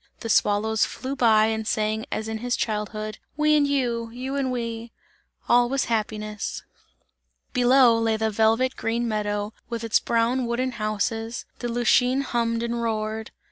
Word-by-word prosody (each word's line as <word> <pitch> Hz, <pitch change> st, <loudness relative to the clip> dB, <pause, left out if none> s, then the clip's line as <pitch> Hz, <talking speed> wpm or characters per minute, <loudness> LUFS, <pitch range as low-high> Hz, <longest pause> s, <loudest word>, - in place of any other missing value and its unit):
The 230 Hz, -, -5 dB
swallows 215 Hz, +1 st, +2 dB
flew 265 Hz, +2 st, -3 dB
by 220 Hz, -4 st, +5 dB
and 220 Hz, -1 st, -2 dB
sang 215 Hz, +1 st, -1 dB
as 220 Hz, 0 st, -3 dB
in 220 Hz, 0 st, -4 dB
his 245 Hz, +1 st, -1 dB
childhood: 215 Hz, 0 st, -3 dB, 0.2 s
"We 305 Hz, 0 st, +4 dB
and 290 Hz, -1 st, +3 dB
you, 245 Hz, -5 st, 0 dB
and 230 Hz, +1 st, -13 dB
You 260 Hz, +2 st, -4 dB
and 270 Hz, -2 st, 0 dB
we!" 230 Hz, -1 st, -4 dB, 0.6 s
All 240 Hz, 0 st, +4 dB
was 270 Hz, +1 st, 0 dB
happiness. 215 Hz, -1 st, -3 dB, 0.9 s
Below 245 Hz, -1 st, +5 dB
lay 225 Hz, -1 st, +1 dB
the 220 Hz, 0 st, 0 dB
velvet 225 Hz, +5 st, +2 dB
green 235 Hz, +1 st, -1 dB
meadow, 210 Hz, -1 st, -2 dB, 0.2 s
with 235 Hz, -1 st, -4 dB
its 225 Hz, -1 st, +3 dB
brown 235 Hz, +2 st, +1 dB
wooden 255 Hz, +2 st, -1 dB
houses, 225 Hz, +1 st, -2 dB
the 240 Hz, -, -3 dB
Lütschine 245 Hz, +3 st, +2 dB
hummed 230 Hz, -2 st, -1 dB
and 235 Hz, 0 st, -2 dB
roared. 220 Hz, -1 st, -2 dB
230 Hz, 160 wpm, -24 LUFS, 220-245 Hz, 0.9 s, by